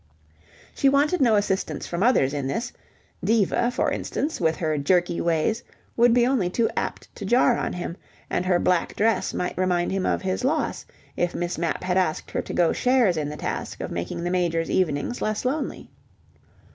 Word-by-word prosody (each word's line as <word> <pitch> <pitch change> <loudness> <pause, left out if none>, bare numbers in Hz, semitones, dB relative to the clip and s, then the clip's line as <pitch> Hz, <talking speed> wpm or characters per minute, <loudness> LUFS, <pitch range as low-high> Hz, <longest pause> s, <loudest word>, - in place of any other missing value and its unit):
She 275 - +3
wanted 290 +5 +2
no 235 -4 +5
assistance 200 -2 -1
from 170 +1 -4
others 200 - +3
in 140 -2 -2
this: 235 - -3 0.5
Diva, 225 +2 +2
for 245 - 0
instance, 300 - -3
with 160 -1 +2
her 155 -2 -1
jerky 175 +3 +1
ways 170 +6 +1 0.3
would 240 0 +5
be 240 0 +4
only 245 -9 +1
too 225 +5 +1
apt - - -4
to - - -8
jar 240 +4 +4
on - - -2
him, 175 -1 -4 0.3
and - - -1
her 180 -1 +4
black 175 -1 +1
dress 225 +2 +1
might 180 - -3
remind 180 -2 +1
him 190 -1 0
of - - 0
his 190 +5 -2
loss 300 +4 -1 0.3
if 175 0 -1
Miss 175 -1 -3
Mapp 165 -2 -2
had 180 0 0
asked 180 -4 0
her - - -1
to - - -8
go 170 -2 +3
shares 250 -8 +3
in 150 -2 -2
the 150 - -6
task - - -4
of - - -5
making 85 - -4
the 175 - -1
Major's 170 -3 0
evenings 180 +6 0
less 215 +2 -1
lonely. 280 +3 -3
185 Hz, 190 wpm, -24 LUFS, 170-240 Hz, 0.5 s, no